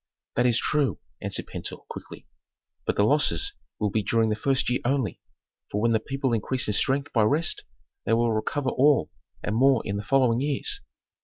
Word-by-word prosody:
"That 125 +1 +3
is 120 -2 +3
true," 145 +2 +1 0.2
answered - - -1
Pentuer, - - -5
quickly, - - -10 0.6
"but - - +1
the 100 - +3
losses 110 - +2 0.3
will 105 -1 0
be 110 - +1
during 115 +2 +1
the - - +1
first 135 +4 +1
year 125 +1 +1
only, 125 -6 -1 0.5
for 105 - -2
when 115 +2 +2
the 110 - +3
people 135 -1 -2
increase 120 +3 0
in 105 - 0
strength 140 +6 +1
by 115 - +3
rest 150 +10 +1 0.4
they 115 - 0
will 115 0 +2
recover 130 +5 -1
all 140 0 +3 0.3
and 105 - -1
more 130 0 +4
in 100 -1 -2
the 100 - -4
following 125 0 +2
years." 150 - 0
125 Hz, 185 wpm, -26 LUFS, 110-135 Hz, 0.6 s, more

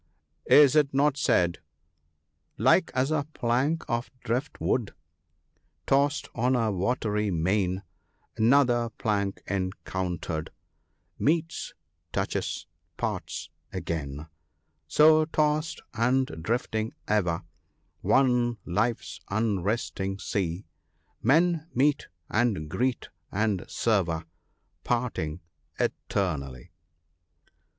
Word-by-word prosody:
Is 145 -1 +8
it 145 -3 +3
not 145 0 +3
said 90 -11 +2 0.3
— 75 -1 -47
" - - -48
Like - - +4
as 130 +3 +1
a 155 -2 0
plank 130 +7 +1
of 120 -2 -1
drift 125 +4 -2
wood 115 -5 0 0.9
Tossed 140 +2 +2
on 125 +2 +1
the 115 -4 +2
watery 105 +1 0
main, 95 +2 0 0.5
Another 120 0 +4
plank 100 -2 -1
encountered, 95 -3 -3 0.7
Meets, 165 +2 0 0.2
— - - -48
touches, - - -2 0.2
— - - -47
parts - - -3 0.2
again; 75 -2 -4 0.6
So 155 +1 +6
tossed, 155 0 0
and 125 +3 +2 0.2
drifting 110 +2 -1
ever, 90 -5 +1 0.6
On 125 -3 +3
life's 110 +6 -1
unresting 100 -1 -1
sea, 95 -2 -2 0.6
Men 160 +5 +3
meet, 145 +3 +2 0.2
and 105 -9 +1
greet, 125 +9 -1 0.2
and 100 -2 0
sever, 90 -8 +1 0.6
Parting 110 -10 -1 0.4
eternally." 70 -10 -2
115 Hz, 95 wpm, -27 LUFS, 95-135 Hz, 0.9 s, Is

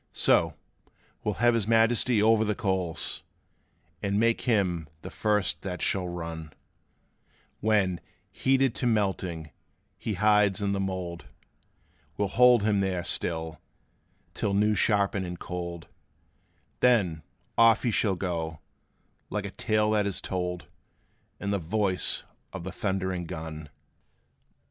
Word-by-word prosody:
So, - - +5 0.7
we - - 0
'll - - -2
have 120 +2 +3
his 110 -3 0
Majesty 115 0 +3
over 110 0 +4
the 105 -1 0
coals, 95 -7 -1 0.8
And 100 0 0
make 115 +1 +2
him 90 -8 +1 0.2
the - - -7
first 105 -2 0
that 90 -2 -5
shall 95 -2 0
run: 80 -3 -6 1.1
When, 100 -5 +1 0.3
heated 135 -2 +2
to 125 - -1
melting, 95 -8 -1 0.5
he 110 - -3
hides 105 +1 +3
in 100 -1 0
the 100 - -1
mould, 95 -3 -4 0.9
We 100 - +1
'll - - -4
hold 125 0 +5
him 105 -2 +2
there 95 -2 -1
still, 80 -3 -2 0.7
till 100 -1 -1
new 105 +1 +3
shapen 100 -2 +2
and 90 -1 -5
cold; 85 -1 -6 0.9
Then, 100 -11 +3 0.3
off 115 -1 +5
he 120 - +1
shall 100 -2 +1
go, 85 -4 -3 0.7
like 105 -1 -3
a 100 - -5
tale 110 0 +1
that 105 -1 +2
is 100 - -3
told, 90 -1 -3 0.7
In 100 - -2
the 100 - 0
voice 95 +2 0 0.3
of 95 -3 -7
the 95 - -5
thundering 95 -3 -2
gun! 80 -1 -7
100 Hz, 135 wpm, -27 LUFS, 90-110 Hz, 1.1 s, So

